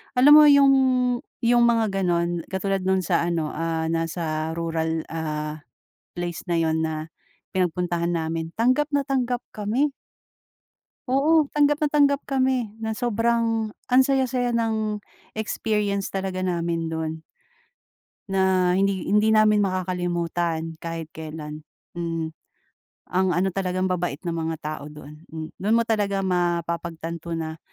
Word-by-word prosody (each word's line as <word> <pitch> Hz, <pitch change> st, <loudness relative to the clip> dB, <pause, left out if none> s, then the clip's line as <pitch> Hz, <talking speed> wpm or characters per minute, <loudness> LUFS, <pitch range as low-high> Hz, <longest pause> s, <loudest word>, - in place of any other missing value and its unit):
alam 260 Hz, +4 st, +6 dB
mo 300 Hz, 0 st, +10 dB
yung, 280 Hz, -1 st, +7 dB, 0.7 s
yung 240 Hz, +1 st, +4 dB
mga 225 Hz, -3 st, +2 dB
gano'n 170 Hz, -1 st, 0 dB
katulad 195 Hz, +1 st, -1 dB
nung 190 Hz, 0 st, +2 dB
sa 170 Hz, -1 st, +1 dB
ano, 165 Hz, -3 st, -1 dB
ah, 165 Hz, 0 st, -2 dB
nasa 165 Hz, -1 st, -2 dB
rural, 165 Hz, -1 st, -1 dB
ah, 155 Hz, -1 st, -3 dB, 0.6 s
place 175 Hz, -1 st, -5 dB
na 175 Hz, -, 0 dB
yun 160 Hz, 0 st, +1 dB
na 155 Hz, 0 st, -5 dB, 0.4 s
pinagpuntahan 175 Hz, -1 st, 0 dB
namin 165 Hz, 0 st, -3 dB
tanggap 255 Hz, +6 st, +2 dB
na 285 Hz, -, +3 dB
tanggap 250 Hz, -3 st, -1 dB
kami. 235 Hz, +8 st, 0 dB, 1.2 s
Oo, 295 Hz, +3 st, +3 dB
tanggap 295 Hz, 0 st, +2 dB
na 300 Hz, -, +3 dB
tanggap 285 Hz, -1 st, +3 dB
kami 260 Hz, -5 st, 0 dB
ng 220 Hz, 0 st, -3 dB
sobrang 230 Hz, -1 st, 0 dB, 0.2 s
ang 255 Hz, +1 st, +7 dB
saya-saya 255 Hz, -3 st, +1 dB
ng 220 Hz, -2 st, -1 dB, 0.3 s
experience 210 Hz, -2 st, -1 dB
talaga 190 Hz, -1 st, -2 dB
namin 170 Hz, -2 st, -1 dB
do'n 160 Hz, 0 st, -4 dB, 1.1 s
na 190 Hz, -1 st, +3 dB
hindi 195 Hz, -1 st, 0 dB
hindi 210 Hz, +2 st, +4 dB
namin 215 Hz, -1 st, +5 dB
makakalimutan 175 Hz, -3 st, -2 dB
kahit 165 Hz, -1 st, -6 dB
kailan, 155 Hz, -1 st, -8 dB, 0.3 s
mm. 165 Hz, -1 st, -2 dB, 0.8 s
Ang 190 Hz, +1 st, +2 dB
ano 185 Hz, +2 st, +2 dB
talagang 185 Hz, 0 st, -1 dB
ambabait 175 Hz, -5 st, -2 dB
ng 175 Hz, -, -2 dB
mga 165 Hz, 0 st, -2 dB
tao 155 Hz, -1 st, -5 dB
doon, 150 Hz, 0 st, -12 dB
m 160 Hz, -1 st, -5 dB
doon 210 Hz, +4 st, +2 dB
mo 230 Hz, -, +4 dB
talaga 205 Hz, -3 st, 0 dB
mapapagtanto 170 Hz, -2 st, -2 dB
na 160 Hz, -1 st, -5 dB
185 Hz, 130 wpm, -24 LUFS, 165-225 Hz, 1.2 s, mo